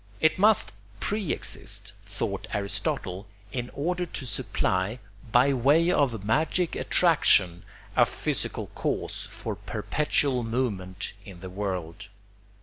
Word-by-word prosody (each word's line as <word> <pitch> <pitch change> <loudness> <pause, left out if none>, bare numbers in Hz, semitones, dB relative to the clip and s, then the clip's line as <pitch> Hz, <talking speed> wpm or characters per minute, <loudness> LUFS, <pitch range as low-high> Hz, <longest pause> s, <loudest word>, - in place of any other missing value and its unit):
It 160 +2 +3
must 210 +1 +5 0.3
pre 205 - -1
exist, 100 -2 -3
thought 100 -1 -3
Aristotle, 100 -1 -2 0.2
in 120 0 -3
order 175 +4 -1
to 140 - -6
supply, 95 -2 +1 0.3
by 130 +4 +5
way 145 +7 +4
of 115 - +1
magic 160 - +1
attraction, 95 - +3 0.3
a - - +6
physical - - -2
cause - - -2
for - - -4
perpetual 140 -3 0
movement 115 -6 -2
in 95 -4 -11
the 95 -1 -7
world. 95 -1 -4
115 Hz, 115 wpm, -27 LUFS, 100-150 Hz, 0.3 s, a